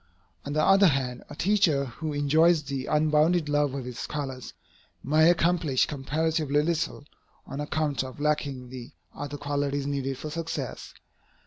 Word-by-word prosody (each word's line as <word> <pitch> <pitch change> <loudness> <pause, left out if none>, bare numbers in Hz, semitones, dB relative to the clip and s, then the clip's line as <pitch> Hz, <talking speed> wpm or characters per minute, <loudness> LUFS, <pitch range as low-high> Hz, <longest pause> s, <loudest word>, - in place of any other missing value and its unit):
On 145 - -4
the 155 0 +2
other 195 +2 +6
hand, 130 -5 -1
a - - -8
teacher 175 -7 +2
who 150 +5 -5
enjoys 155 +3 +3
the 135 -2 -4
unbounded 155 +2 +3
love 145 -2 +1
of 135 -3 -4
his 125 -1 -7
scholars, 135 -4 -5 0.5
may 155 +4 +4
accomplish 165 -5 +2
comparatively 150 +1 0
little, 165 -2 -1 0.4
on 140 +1 -5
account 150 -3 -1
of 130 0 -9
lacking 145 -4 -1
the 125 -2 -9 0.2
other 145 0 -6
qualities 145 -1 -2
needed 135 -2 -2
for 155 +3 -6
success. 160 -5 -5
145 Hz, 145 wpm, -27 LUFS, 135-155 Hz, 0.5 s, other